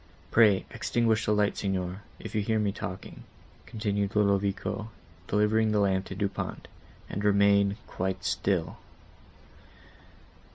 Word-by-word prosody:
Pray 105 -5 +5
extinguish 115 -2 +1
the - - +3
light, 105 -1 +2
Signor, 95 -1 -2 0.2
if - - -9
you 110 - +1
hear 110 +2 0
me 105 -2 +1
talking," 95 -2 -7 0.5
continued 105 -3 -2
Ludovico, 100 +1 0 0.4
delivering 105 +1 +2
the 105 - +3
lamp 95 -1 +2
to 95 - -7
Du 100 +1 0
Pont, - - -6 0.4
"and 100 - -4
remain 100 0 +4
quite 95 0 -3
still." - - -1
100 Hz, 125 wpm, -28 LUFS, 100-105 Hz, 0.5 s, Pray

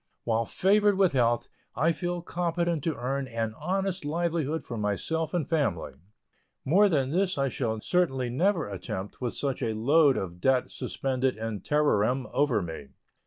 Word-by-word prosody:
While 115 0 +1
favored 205 - +3
with 190 -3 +4
health, 120 -2 +2 0.3
I 160 +3 +3
feel 175 +1 -3
competent 170 -3 -1
to 160 -3 0
earn 135 +2 -2
an 115 -2 -3
honest 190 - -2
livelihood 160 0 -1
for 120 - -6
myself 115 +10 -1
and 175 -5 -1
family. 140 - 0 0.7
More 200 +8 +5
than 140 -6 +1
this 185 +1 +1
I 135 -1 +1
shall 115 -4 -2
certainly 135 -9 0
never 170 - +1
attempt 95 +1 -6
with 125 -2 -2
such 140 -2 -2
a 110 -1 -1
load 140 +5 +4
of 90 -2 -5
debt 130 +2 +2
suspended 130 -2 -2
in 110 -2 -4
terrorem 130 -4 +2
over 135 -8 +2
me. 80 -4 -7
140 Hz, 160 wpm, -28 LUFS, 115-170 Hz, 0.7 s, More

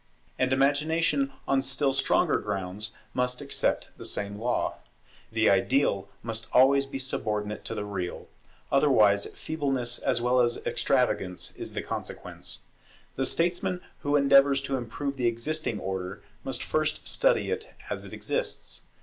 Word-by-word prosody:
And 130 0 +2
Imagination 145 +1 +2 0.2
on 135 -1 +3
still 135 +1 +1
stronger 135 - +2
grounds 100 +1 -3 0.2
must 125 0 0
accept 140 - 0
the - - -9
same 100 0 -3
law. 120 +2 0 0.5
The 110 0 +2
ideal 100 +1 +2
must 115 0 -4
always 135 +2 +6
be 135 - -5
subordinate 105 -5 -2
to 115 - -3
the 105 -1 -3
real; 95 -4 -4 0.4
otherwise 110 -8 +4
feebleness 135 -6 -1
as 125 - +1
well 125 +1 +3
as 120 -1 +1
extravagance 90 -1 0
is - - -5
the - - -3
consequence. - - -6 0.5
The 135 - 0
statesman 180 +2 0 0.2
who 145 0 0
endeavours 140 -1 +5
to 140 -1 -1
improve 135 +3 -3
the 125 -2 +2
existing 120 0 -1
order, 95 +1 -4 0.2
must 135 - -3
first 155 0 -1
study - - +2
it 455 +1 -3 0.2
as - - -1
it - - -8
exists. - - -3
130 Hz, 140 wpm, -28 LUFS, 110-140 Hz, 0.5 s, always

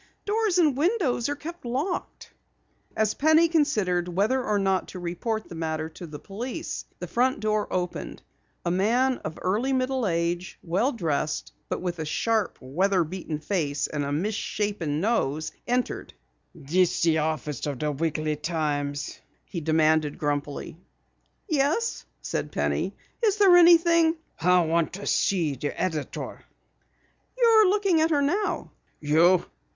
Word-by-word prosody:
"Doors 420 -3 +1
and 310 -6 +4
windows 300 - +1
are 290 - -1
kept 335 +4 -8
locked." 270 +10 -3 0.7
As 215 -1 +2
Penny 315 +3 +4
considered 215 - +1
whether 205 +9 +1
or 210 -3 +1
not 190 -2 +1
to 185 - -8
report 195 +6 -3
the - - -10
matter 160 -1 -3
to 170 +2 -10
police, 225 - -5
the 180 - -5
front 250 - +1
door 215 -1 0
opened. 180 -1 -3 0.4
A 170 - +1
man 240 +8 +2
of 160 - -6
early 225 +9 +1
middle 255 -2 0
age, 170 +1 -1
well 190 +10 +1
dressed, 155 - -2 0.2
but - - -3
with 175 -2 -3
a 160 - -2
sharp, 220 +6 0
weather 180 +8 +1
beaten 165 -2 -5
face 150 -3 -1
and 150 -1 -3
a 140 - -3
mis 185 +9 -1
shapen 200 -8 -2
nose, 155 - 0 0.2
entered. 245 +1 -2 0.4
"This 170 +5 +1
the 160 -1 +3
office 150 -3 -2
of 140 -2 -3
the 150 +3 -1
Weekly 155 +1 -1
Times?" 145 -2 -2 0.3
he 170 - -5
demanded 155 -1 +2
grumpily. 145 +1 -3 0.7
"Yes," 315 +8 0 0.2
said - - -3
Penny. - - -1 0.3
"Is 420 -2 +3
there 390 -4 +7
anything 335 -1 +6 0.2
" - - -44
"I 180 +1 +5
want 165 0 +1
to 200 +2 -6
see 170 -7 +1
the 140 +2 -4
editor." 160 -6 -3 0.9
"You're 450 -4 +6
looking 390 -5 +2
at 320 - +3
her 290 -3 +2
now." 400 +9 -1 0.3
"You! 165 +5 +4
185 Hz, 145 wpm, -26 LUFS, 160-265 Hz, 0.9 s, there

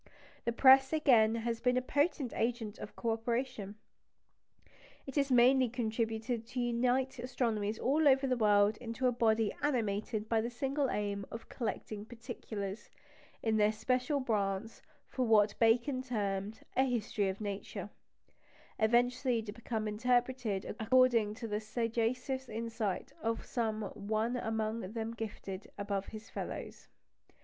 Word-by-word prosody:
The 235 - +1
press, 265 +2 +7
again, 235 -8 +5
has 230 0 -2
been 250 0 +2
a - - +2
potent 285 -1 0
agent 230 -2 -2
of - - -8
co 230 - -1
operation. 225 -2 -2 1.3
It 270 - -7
has 280 -2 +1
mainly 255 +1 +5
contributed 225 0 -2
to 250 +1 -4
unite 245 +2 +1
astronomers 225 -4 -1
all 295 +4 +2
over 270 0 +5
the 255 -1 +1
world 210 -2 +4
into 245 +2 -4
a 250 - +5
body 225 -3 +2
animated 215 -5 -1
by 225 -1 +2
the 235 - -2
single 270 +2 -1
aim 200 -1 -2
of 225 - -8
collecting 215 -2 -4
"particulars" 220 -4 -6 0.5
in 220 -1 +2
their 210 0 +4
special 255 +6 0
branch 210 -3 -1 0.2
for 260 - -2
what 210 -2 +5
Bacon 240 +4 +3
termed 210 -4 -3
a 260 - +4
History 215 -5 0
of 190 - -4
Nature, 205 -2 -5 0.9
eventually 240 +1 +2
to 210 - -6
be 230 - -15 0.2
interpreted 240 -1 0
according 230 -2 +4
to 230 - -6
the 210 -1 -1
sagacious 240 +4 -1
insight 225 -3 -3
of 225 0 -2
some 220 -3 -1
one 215 +4 -1
among 220 -3 -2
them 225 0 -3
gifted 205 -3 -6
above 200 -1 -2
his 220 0 -9
fellows. - - -6
230 Hz, 140 wpm, -33 LUFS, 215-250 Hz, 1.3 s, press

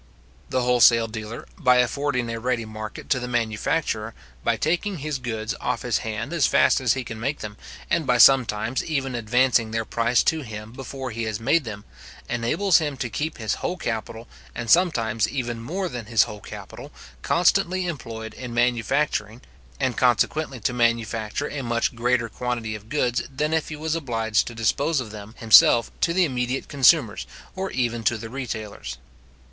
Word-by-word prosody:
The 130 -1 0
wholesale 120 -2 +5
dealer, 110 0 -7
by 125 -5 +5
affording 125 0 0
a 115 - -4
ready 120 -1 -1
market 110 0 -8
to 130 - +3
the 125 - -5
manufacturer, 115 0 -1 0.3
by - - +1
taking 175 +5 0
his 150 -1 -3
goods 110 -3 -3
off - - -2
his - - +1
hand 110 +7 -4
as 165 -5 +3
fast - - +4
as 120 -3 +3
he 130 - -3
can 110 -2 -7
make 135 +5 -2
them, 105 -1 -6 0.3
and 165 -4 0
by 125 - +3
sometimes 120 -1 +4
even 135 -4 -2
advancing 120 0 +2
their 115 0 -2
price 115 +2 +2
to 160 -1 +1
him 110 -3 -8
before 135 0 -6
he 115 +1 -3
has 110 -2 -3
made 140 +6 +2
them, 105 -2 -7 0.4
enables 120 +12 +2
him 145 -4 -3
to 120 -2 -4
keep 155 +6 -3
his 110 -3 -1
whole 180 - -2
capital, 115 -4 -4 0.3
and 115 -2 -2
sometimes 115 - +3
even 120 -3 -3
more 185 +10 -3
than 120 -8 -6
his 115 -2 +4
whole 105 - -7
capital, - - -10 0.3
constantly 185 +1 +2
employed 115 -9 -6
in 125 -2 -7
manufacturing, 120 -1 0 0.4
and 130 -3 0
consequently 130 +3 +1
to 120 - -1
manufacture 115 +1 0
a 145 - -4
much 120 -1 0
greater 120 0 +1
quantity 115 -2 -3
of 105 +1 -9
goods 125 -4 +1
than 150 +4 -1
if 160 -1 0
he 155 - -5
was 155 +1 -2
obliged 115 -8 0
to 120 - -7
dispose 140 +7 +1
of 115 -4 -5
them 105 +1 -10
himself 115 +1 +6
to 170 - +3
the 180 +1 +3
immediate 125 -2 -2
consumers, 140 -4 +3 0.3
or 190 0 -3
even 120 -2 -1
to 115 +2 +2
the 115 +1 -8
retailers. 110 - -5
120 Hz, 175 wpm, -24 LUFS, 115-140 Hz, 0.4 s, himself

